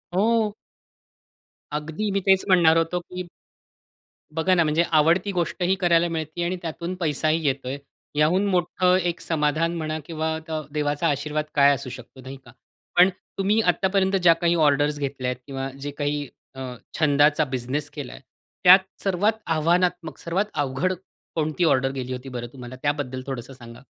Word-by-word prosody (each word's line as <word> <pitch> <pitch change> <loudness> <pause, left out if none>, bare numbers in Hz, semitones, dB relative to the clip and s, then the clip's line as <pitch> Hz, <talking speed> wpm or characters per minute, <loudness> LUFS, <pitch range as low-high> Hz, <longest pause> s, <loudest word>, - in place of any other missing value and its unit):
हो. 220 +1 +2 1.2
अगदी 160 +8 -3
मी 195 - +1
तेच 190 -1 +5
म्हणणार 170 -4 +5
होतो 165 +2 +1
की 180 +1 -8 1.1
बघा 185 +3 +2
ना, 170 - +4
म्हणजे 155 +2 +2
आवडती 170 +6 +3
गोष्टही 175 +1 0
करायला 170 -1 +4
मिळते 160 +1 -3
आणि 180 +2 -1
त्यातून 170 +2 -4
पैसाही 155 0 0
येतोय, 135 0 -2 0.4
याहून 165 +7 +3
मोठं 180 0 +2
एक 175 -2 -1
समाधान 160 +1 0
म्हणा 155 -1 -3
किंवा 160 -1 -2
अ, - - -4
द 155 -1 -2
देवाचा 150 +2 0
आशीर्वाद 150 +2 -1
काय 140 0 +6
असू 135 -1 -5
शकतो, 125 +1 -11
नाही 130 +2 -9
का? - - -14 0.5
पण 180 +2 +8 0.3
तुम्ही 200 +3 +2
आत्तापर्यंत 190 0 +2
ज्या 170 -1 +7
काही 170 +1 +1
ऑर्डर्स 145 -1 +2
घेतल्यात 135 -3 -2
किंवा 135 -1 -4
जे 145 0 -4
काही 145 -1 -1 0.3
अ, - - -9 0.4
छंदाचा 150 0 +4
बिझनेस 130 +3 -3
केलाय 145 -3 -8 0.4
त्यात 185 +2 +9 0.2
सर्वात 195 +3 +2 0.2
आव्हानात्मक, 175 +1 +1
सर्वात 180 +5 -1
अवघड 145 +6 0 0.4
कोणती 155 +2 0
ऑर्डर 135 -3 +2
गेली 130 -2 -5
होती 130 +1 -7
बरं 120 -1 -5
तुम्हाला? 125 -1 -9
त्याबद्दल 145 -3 -1
थोडंसं 135 0 -6
सांगा? 120 -2 -12
155 Hz, 155 wpm, -24 LUFS, 140-175 Hz, 1.2 s, त्यात